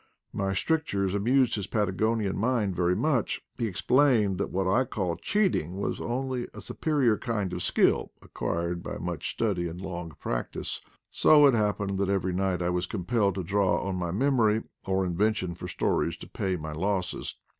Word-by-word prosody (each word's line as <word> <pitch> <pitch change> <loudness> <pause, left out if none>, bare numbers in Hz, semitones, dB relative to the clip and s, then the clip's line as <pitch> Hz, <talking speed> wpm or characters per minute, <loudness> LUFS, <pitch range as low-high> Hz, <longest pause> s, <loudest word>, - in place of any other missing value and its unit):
My 95 -1 -1
stric 160 +11 +1
tures 100 -5 -1
amused 125 +5 +3
his 100 -3 -2
Patagonian 105 0 0
mind 110 -4 0
very 90 0 +2
much; 125 +1 +1 0.2
he 115 - +1
explained 110 -2 +3
that - - -1
what 95 0 -1
I 120 +8 +3
called 95 -8 -3
cheating 180 - +1
was - - -2
only 125 0 -2
a - - -8
superior 135 -9 +1
kind 105 -6 -2
of 90 - -3
skill - - +2
acquired 85 +1 -3
by - - -5
much 85 -2 -4
study 95 -6 -1
and 85 +1 -7
long 90 -3 -6
practice; - - -3 0.3
so 150 -1 +6
it 140 - +6
happened 105 -3 0
that 100 -1 +1
every 95 -2 0
night 95 -1 0
I 85 - +1
was 90 +1 -1
compelled 100 +1 0
to 95 - -2
draw 95 -1 +2
on 95 - -1
my 90 -2 -2
memory 110 0 +2 0.2
or 95 0 +1
inven 100 +5 +1
tion 90 -4 -3
for 85 - -7
stories - - 0
to - - -10
pay 95 -1 -2
my 80 -2 -5
losses. 90 +3 -2
100 Hz, 180 wpm, -28 LUFS, 90-115 Hz, 0.3 s, so